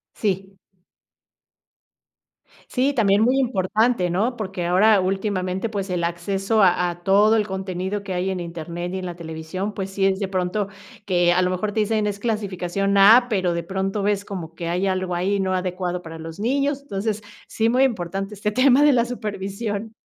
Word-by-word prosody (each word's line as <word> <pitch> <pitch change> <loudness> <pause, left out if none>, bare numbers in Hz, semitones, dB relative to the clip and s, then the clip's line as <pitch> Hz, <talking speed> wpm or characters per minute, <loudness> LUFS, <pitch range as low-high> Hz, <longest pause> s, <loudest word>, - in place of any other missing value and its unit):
Sí. 195 -2 -2 2.1
Sí, 275 +3 +1
también 205 -4 +3
muy 255 +4 +3
importante, 220 -3 +1
¿no?, 215 +8 0
porque 190 -4 -4
ahora 195 +4 +5
últimamente, 190 +1 -1
pues, 200 -3 -4
el 175 -2 -1
acceso 195 +5 0
a 185 -2 +7 0.2
a 175 0 -8
todo 205 +3 +5
el 215 -2 +2
contenido 190 +1 -3
que 195 - -4
hay 180 +1 -1
en 190 -1 -2
Internet 170 +1 -5
y - - -2
en 185 - -6
la 175 -1 -5
televisión, 165 +5 -5
pues, 195 -1 -4
sí 195 0 0
es 190 0 +2
de 195 - -1
pronto 190 +2 -1 0.4
que 175 -2 +3
a 185 - +3
lo 180 - +1
mejor 185 +3 -2
te 220 - -2
dicen: 215 0 0
"Es 200 -1 -3
clasificación 200 -3 -1
A", 225 +5 +7
pero 185 -5 +1
de 170 0 -2
pronto 195 +3 -2
ves 205 0 0
como 165 -4 -7
que 170 0 -5
hay 180 +3 0
algo 185 -1 -1
ahí 195 +3 0
no 190 -1 0
adecuado 180 -1 -2
para 165 -1 -9
los 165 +3 -8
niños. 280 +4 0
Entonces, 215 -4 -3 0.3
sí 225 +1 0
muy 255 +3 +3
importante 195 -3 -2
este 210 +1 -2
tema 255 +4 +5
de 295 -2 +6
la 235 -1 +3
supervisión. 210 -1 -4
195 Hz, 185 wpm, -22 LUFS, 180-215 Hz, 2.1 s, a